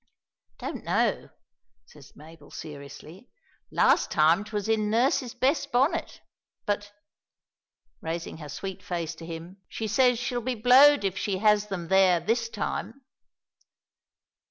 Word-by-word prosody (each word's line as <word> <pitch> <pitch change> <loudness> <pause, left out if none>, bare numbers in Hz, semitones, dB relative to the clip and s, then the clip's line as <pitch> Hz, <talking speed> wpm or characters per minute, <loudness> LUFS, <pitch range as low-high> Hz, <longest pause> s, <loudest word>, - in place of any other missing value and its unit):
"Don't - - -6
know," - - 0 0.6
says 135 +2 -17
Mabel 155 -1 -15
seriously. 150 - -11 0.4
"Last - - +3
time 160 +5 +3
'twas 210 -1 -4
in 215 -1 +1
nurse's 245 +2 +1
best 280 +3 0
bonnet; 270 +6 0 0.4
but," 205 0 -2 1.1
raising 165 +1 -5
her 150 -2 -9
sweet 190 +6 -6
face 170 -2 -4
to 165 0 -11
his, 165 -1 -6 0.3
"she 220 - -4
says 245 +3 +3
she'll 245 0 -3
be 255 +2 -2
blowed 260 +5 +6
if 195 -1 -2
she 195 -2 -1
has 210 +1 +3
them 180 -4 -5
there 190 -2 +4
this 230 +4 -1
time!" 230 +4 -5
205 Hz, 130 wpm, -26 LUFS, 165-240 Hz, 1.1 s, blowed